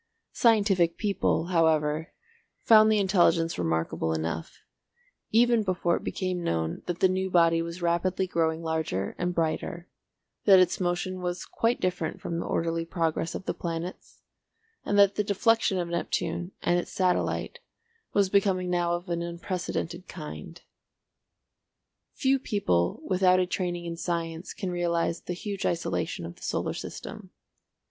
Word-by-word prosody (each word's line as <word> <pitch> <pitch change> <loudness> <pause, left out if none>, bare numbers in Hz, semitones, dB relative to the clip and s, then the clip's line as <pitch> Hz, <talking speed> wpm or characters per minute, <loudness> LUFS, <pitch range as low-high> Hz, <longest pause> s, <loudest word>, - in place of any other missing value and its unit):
Scientific 200 -7 +3
people, 200 -6 +1
however, 160 -1 +2 0.5
found 215 -1 +7
the 215 - +4
intelligence 175 - +2
remarkable 80 -1 -1
enough, 80 +1 -4 0.7
even 235 0 +4
before 180 -3 +1
it - - -9
became 185 -2 -2
known 80 - -1
that 175 -1 -3
the 190 - +7
new 190 +1 -1
body 165 -2 +4
was 170 +1 -6
rapidly 175 +2 +1
growing 165 -2 0
larger 160 - -2
and 180 0 -1
brighter, 165 +1 -2 0.6
that 195 -2 +8
its 185 -1 +3
motion 185 +1 -1
was 175 0 -3
quite 230 +2 0
different 180 -3 -2
from 170 0 -3
the - - -4
orderly 165 0 -1
progress 165 -1 -1
of 190 - -6
the - - -1
planets, 170 +2 -6 0.6
and 205 - 0
that 200 -1 +6
the 210 - +2
deflection 205 0 +2
of 175 -1 -1
Neptune 170 +1 -2
and 175 0 +3
its - - -6
satellite 185 - 0 0.5
was 200 -1 +3
becoming 190 -2 +1
now 175 -1 +1
of 175 +1 -7
an 170 -1 -2
unprecedented 170 0 -4
kind. 170 +1 -9 1.5
Few 270 0 +2
people 145 - 0
without 185 -1 +4
a 185 - +2
training 175 -1 -3
in 170 0 -5
science 165 0 -3
can 190 -3 -3
realise 170 -1 0
the 180 - -5
huge 200 +2 -5
isolation 90 - -1
of 85 - -9
the - - -20
solar - - -2
system. - - -8
175 Hz, 145 wpm, -27 LUFS, 165-190 Hz, 1.5 s, that